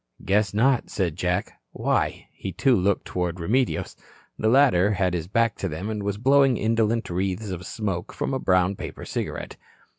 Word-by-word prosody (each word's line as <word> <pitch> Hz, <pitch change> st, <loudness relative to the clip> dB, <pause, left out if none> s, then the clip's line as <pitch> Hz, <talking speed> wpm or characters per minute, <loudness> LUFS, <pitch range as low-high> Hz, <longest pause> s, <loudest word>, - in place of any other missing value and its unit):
"Guess 105 Hz, +2 st, +2 dB
not," 125 Hz, +3 st, +2 dB
said 90 Hz, -6 st, -1 dB
Jack. 90 Hz, +2 st, -1 dB, 0.2 s
"Why?" -, -, 0 dB
He, 95 Hz, -, -6 dB
too, 125 Hz, +9 st, +3 dB
looked 100 Hz, 0 st, +1 dB
toward 90 Hz, -1 st, -3 dB
Remedios. 120 Hz, +9 st, 0 dB, 0.4 s
The 110 Hz, -, +1 dB
latter 115 Hz, -7 st, +4 dB
had 90 Hz, -2 st, 0 dB
his 85 Hz, -2 st, -3 dB
back 115 Hz, +2 st, +1 dB
to 95 Hz, -, -3 dB
them 90 Hz, +8 st, -4 dB
and 105 Hz, -1 st, -3 dB
was 100 Hz, 0 st, -2 dB
blowing 135 Hz, +1 st, +4 dB
indolent 115 Hz, +1 st, +1 dB
wreaths 95 Hz, +3 st, -2 dB
of 90 Hz, 0 st, -6 dB
smoke 95 Hz, -6 st, -3 dB
from -, -, -3 dB
a 130 Hz, -, 0 dB
brown 90 Hz, -1 st, +2 dB
paper -, -, -7 dB
cigarette. -, -, -4 dB
100 Hz, 175 wpm, -25 LUFS, 90-115 Hz, 0.4 s, latter